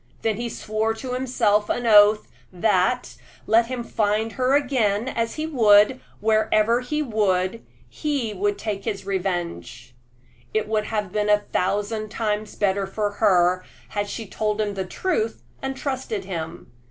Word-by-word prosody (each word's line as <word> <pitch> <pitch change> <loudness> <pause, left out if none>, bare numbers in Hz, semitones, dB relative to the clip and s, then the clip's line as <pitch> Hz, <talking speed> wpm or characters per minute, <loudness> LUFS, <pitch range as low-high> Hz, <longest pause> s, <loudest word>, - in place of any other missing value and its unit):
Then 220 -2 0
he 235 +1 -3
swore 220 0 -2
to 250 +2 -5
himself 230 -5 +1
an 245 0 -1
oath 210 -1 +6 0.2
that, 195 +5 +1 0.3
let 230 +1 +4
him 250 -1 -4
find 220 0 0
her 260 +2 +1
again, 245 -6 +1
as 230 -3 -2
he 310 - -2
would 225 -4 +5 0.2
wherever 220 +2 +2
he 300 +4 -2
would 210 -3 0 0.2
he 280 -8 -2
would 205 +1 -1
take 205 -3 -4
his 195 -2 -3
revenge. 175 - -3 0.6
It 215 -1 +1
would 215 -1 0
have 210 -4 -2
been 210 +1 0
a 210 - +6
thousand 205 +3 -1
times 215 -1 -2
better 195 -1 0
for 205 +1 -2
her 185 -3 +3 0.3
had 205 -1 -2
she 225 - -5
told 210 +1 -2
him 210 -1 0
the 190 -1 -3
truth 225 - -2 0.2
and 270 0 -4
trusted 260 -8 -3
him. 165 -4 -6
215 Hz, 155 wpm, -23 LUFS, 200-230 Hz, 0.6 s, oath